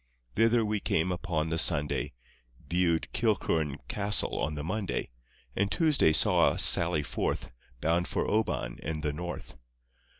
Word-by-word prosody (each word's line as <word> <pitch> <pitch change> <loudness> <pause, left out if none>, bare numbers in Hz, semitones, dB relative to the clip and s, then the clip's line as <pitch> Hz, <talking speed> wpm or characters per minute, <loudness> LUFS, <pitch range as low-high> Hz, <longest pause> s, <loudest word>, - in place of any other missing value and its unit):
Thither 115 +1 +3
we 105 0 -1
came 90 -1 0
upon 85 -3 -2
the 80 0 +2
Sunday, 75 -3 +1 0.5
Viewed 85 -1 +1
Kilchurn 80 -10 0
Castle 105 0 0
on 75 +3 -2
the 75 - -5
Monday, 95 - -3 0.4
And 100 +1 0
Tuesday 155 - +3
saw 80 - +4
us - - +2
sally 85 -3 +3
forth - - -3 0.3
Bound 85 +2 +1
for - - -1
Oban 105 - -1
and 80 -1 -4
the 75 -2 -1
North. 85 -3 -7
85 Hz, 140 wpm, -29 LUFS, 80-105 Hz, 0.5 s, saw